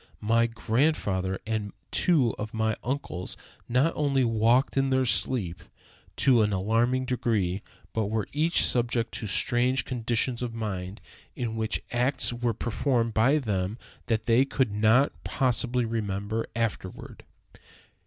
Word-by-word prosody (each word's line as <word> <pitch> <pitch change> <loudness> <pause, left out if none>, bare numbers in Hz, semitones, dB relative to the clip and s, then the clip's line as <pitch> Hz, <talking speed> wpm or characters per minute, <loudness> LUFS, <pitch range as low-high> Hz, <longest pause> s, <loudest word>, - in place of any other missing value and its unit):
My 115 +2 +2
grandfather 110 -6 0
and 110 -2 -3 0.2
two 145 - +2
of 105 +1 -5
my 110 -1 +1
uncles 120 -8 -4 0.3
not 130 +7 +2
only 140 -3 +1
walked 115 +3 +2
in 135 0 +2
their 130 0 +2
sleep 105 -8 0 0.5
to 125 -4 +4
an 105 -1 +2
alarming 115 +7 +1
degree, 110 -7 0 0.3
but 110 -2 0
were 110 0 -1
each 160 +4 +3
subject 120 -1 +1
to 110 - -4
strange 125 +5 +1
conditions 120 0 0
of 120 -2 -4
mind, 100 -3 -4 0.3
in 115 -2 -3
which 110 -1 -1
acts 125 +1 0
were 120 -1 -1
performed 120 -1 0
by 130 +8 +4
them 105 -6 -2 0.3
that 115 -2 0
they 120 +3 +4
could 135 -4 0
not 110 +6 +4
possibly 125 -2 0
remember 110 -1 -2
afterward." 115 -5 -4
115 Hz, 135 wpm, -27 LUFS, 110-130 Hz, 0.5 s, to